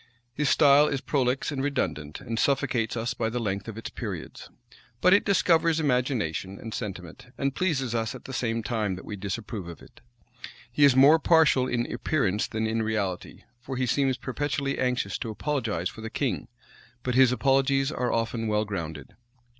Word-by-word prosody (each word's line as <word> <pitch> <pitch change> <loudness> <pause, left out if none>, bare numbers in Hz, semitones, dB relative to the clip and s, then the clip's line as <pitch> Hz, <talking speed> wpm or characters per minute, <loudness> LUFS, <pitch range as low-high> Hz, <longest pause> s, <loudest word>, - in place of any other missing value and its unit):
His 145 +1 0
style 145 0 +6
is 135 - -1
prolix 130 -1 0
and 135 -2 -2
redundant, 75 - -2
and 115 0 -4
suffocates 120 -4 +1
us 115 +1 -1
by 110 -1 -1
the 120 - -4
length 100 -3 -3
of 115 -1 -7
its 115 - -6
periods: - - -7 0.5
but 180 +6 +5
it 200 - +5
discovers 165 -4 +3
imagination 125 - -1
and 110 -1 -7
sentiment, 95 -3 -7
and 135 -1 -1
pleases 135 -8 -1
us 115 -2 -1
at - - -12
the 135 - -7
same 115 -3 -1
time 105 -3 -1
that 90 - -10
we 105 - -5
disapprove 100 0 -5
of 85 -2 -9
it. - - -18 0.7
He 145 +5 +4
is 140 -3 +5
more 140 +5 +7
partial 160 -6 +4
in 120 -1 0
appearance 105 -10 0
than 110 0 -2
in 110 +1 0
reality 105 -5 -3 0.2
for 130 +1 -6
he 130 - +1
seems 135 +1 +1
perpetually 140 +2 -2
anxious 125 -1 -1
to 115 - -4
apologize 110 - -2
for 110 - -11
the 110 - -5
king; 130 +2 -2 0.6
but 125 - -1
his 130 0 +6
apologies 135 +1 +2
are 125 -3 -1
often 115 0 -1
well 105 0 +1
grounded. 80 -8 -6
125 Hz, 180 wpm, -27 LUFS, 110-140 Hz, 0.7 s, more